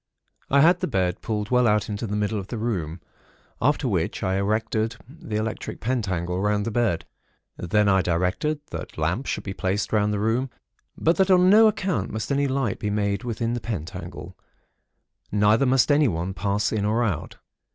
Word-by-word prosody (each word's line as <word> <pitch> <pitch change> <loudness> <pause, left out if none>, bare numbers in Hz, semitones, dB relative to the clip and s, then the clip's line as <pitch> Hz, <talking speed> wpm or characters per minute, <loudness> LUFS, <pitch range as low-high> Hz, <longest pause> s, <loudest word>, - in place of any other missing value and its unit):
I 140 +1 +5
had 170 +4 +5
the - - -1
bed 90 -7 -1
pulled 105 0 -3
well 125 -1 +4
out 105 -1 +2
into 105 +2 -4
the 105 - -3
middle 105 0 -1
of 95 - -7
the 115 - -5
room; 90 -8 -3 0.6
after - - +2
which - - -1
I 95 +1 +1
erected 110 +2 0
the 130 -6 -8
electric 110 +1 -3
pentacle 95 -7 -1
round 105 0 +1
the 115 - -2
bed. 110 -7 0 0.5
Then 105 +4 +1
I 95 -1 +4
directed 90 - 0
that - - -7
lamps 85 - -1
should - - -2
be 95 - -5
placed 95 +3 -2
round 105 -1 +2
the 105 - -1
room, 115 +6 0 0.5
but 165 +2 +2
that 190 0 +3
on 185 0 +6
no 220 +2 +8
account 190 -5 -1
must 110 +2 -4
any 140 0 +2
light 130 -5 -1
be 105 - -2
made 100 +1 -1
within 115 -1 -2
the 120 - -3
pentacle, 85 -3 -6 1.0
neither 105 +6 +3
must 130 +2 +3
anyone 95 - +2
pass 100 +1 0
in 110 -2 -1
or 110 +3 +1
out. 100 -10 -3
105 Hz, 185 wpm, -24 LUFS, 100-125 Hz, 1.0 s, no